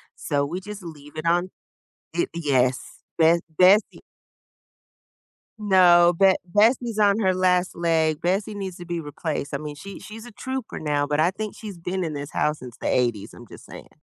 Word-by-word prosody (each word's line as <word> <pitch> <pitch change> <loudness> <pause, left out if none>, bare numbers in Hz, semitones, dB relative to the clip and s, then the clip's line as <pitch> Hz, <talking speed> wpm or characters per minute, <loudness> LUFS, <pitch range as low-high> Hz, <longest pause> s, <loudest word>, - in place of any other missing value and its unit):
So, 145 -2 -1
we 175 +6 -5
just 210 0 -9
leave 150 -3 -11
it 155 - -5
on 175 +2 +2 0.7
It, 170 - -1
yes, 135 -5 0 0.2
Be 165 +1 +5 0.2
Bessie 195 +4 +4 1.6
No, 175 -3 +5
but 195 0 +5
Bessie's 220 +4 +2
on 205 +1 +4
her 190 -3 +2
last 180 0 +1
leg, 160 -2 +1
Bessie 195 +4 -1
needs 190 -3 -6
to 175 - -9
be 170 -1 -4
replaced. 150 -1 -5
I - - 0
mean, 150 0 -7
she 195 +6 -10
she's 215 +4 -10
a 240 - -11
trooper 260 +2 -6
now, 145 -2 0
but 145 +1 -1
I 170 +4 +3
think 215 +1 -5
she's 205 -5 -9
been 180 +2 -3
in 155 - -4
this 145 +1 -6
house 150 0 0
since 125 0 -11
the - - -4
'80 120 -5 0
I'm - - -13
just - - -14
saying, - - -12
175 Hz, 185 wpm, -24 LUFS, 150-195 Hz, 1.6 s, Be